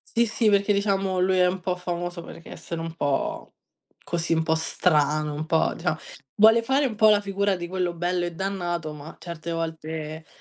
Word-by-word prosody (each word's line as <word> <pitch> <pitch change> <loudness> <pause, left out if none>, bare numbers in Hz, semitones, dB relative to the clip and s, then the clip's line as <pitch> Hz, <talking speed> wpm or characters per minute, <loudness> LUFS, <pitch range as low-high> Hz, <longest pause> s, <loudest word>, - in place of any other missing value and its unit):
Sì, 235 +1 +4
sì, 220 0 +2
perché 200 0 +3
diciamo 195 -2 +1
lui 185 0 +3
è 180 - +5
un 185 +1 -1
po' 180 0 -1
famoso 175 -1 -4
perché 165 - -11
essere 165 -1 -6
un 165 0 -5
po' 145 -4 -2 0.5
così, 170 -1 0
un 160 - +1
po' 160 0 +1
strano, 155 -2 +1
un 150 +2 -4
po' 160 0 +2
dicia 165 -2 -2 0.4
vuole 225 +2 +6
fare 270 +4 +2
un 240 -5 -1
po' 220 0 +6
la 210 -1 +5
figura 200 -1 0
di 175 - -5
quello 180 -1 -2
bello 175 +1 -1
e 175 - -6
dannato, 175 -4 -3
ma 150 +1 -10
certe 170 -1 -6
volte, 160 -1 -5
175 Hz, 195 wpm, -25 LUFS, 160-195 Hz, 0.5 s, vuole